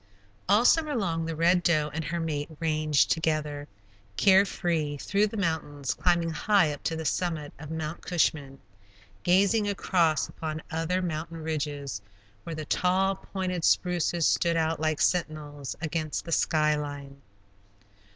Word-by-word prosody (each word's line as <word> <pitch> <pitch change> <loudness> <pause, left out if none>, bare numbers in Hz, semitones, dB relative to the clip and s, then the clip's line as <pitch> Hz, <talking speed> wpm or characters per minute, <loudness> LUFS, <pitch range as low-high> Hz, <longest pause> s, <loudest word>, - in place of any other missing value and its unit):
All 210 +4 +5
summer 305 +1 +4
long 165 -7 -1
the 165 - -3
Red 175 +3 +3
Doe 155 -4 +1
and 160 +1 -3
her 170 +1 -2
mate 150 -2 -3
ranged 155 -2 +2
together, 155 -3 -1 0.5
care 195 0 +6
free, 160 -6 -2
through 200 +8 +1
the 220 - -7
mountains, 160 -6 -2
climbing 170 -2 +1
high 175 -1 +2
up 145 - -9
to 165 - 0
the 160 0 -5
summit 155 -1 -2
of 150 0 -9
Mount 160 0 -4
Cushman, 145 -5 0 0.6
gazing 200 +4 +3
across 175 -5 +1
upon 160 0 -6
other 165 +3 -1
mountain 165 -1 -4
ridges, 145 -7 -3 0.4
where 165 - -5
the 155 0 -5
tall 185 +4 +2
pointed 185 -2 -4
spruces 175 -2 +2
stood 170 -1 +2
out 160 -1 0
like 155 -1 0
sentinels 150 -5 -1
against 160 -2 -3
the 165 - -6
sky 155 -1 +2
line. 140 -2 -6
160 Hz, 145 wpm, -27 LUFS, 150-180 Hz, 0.6 s, care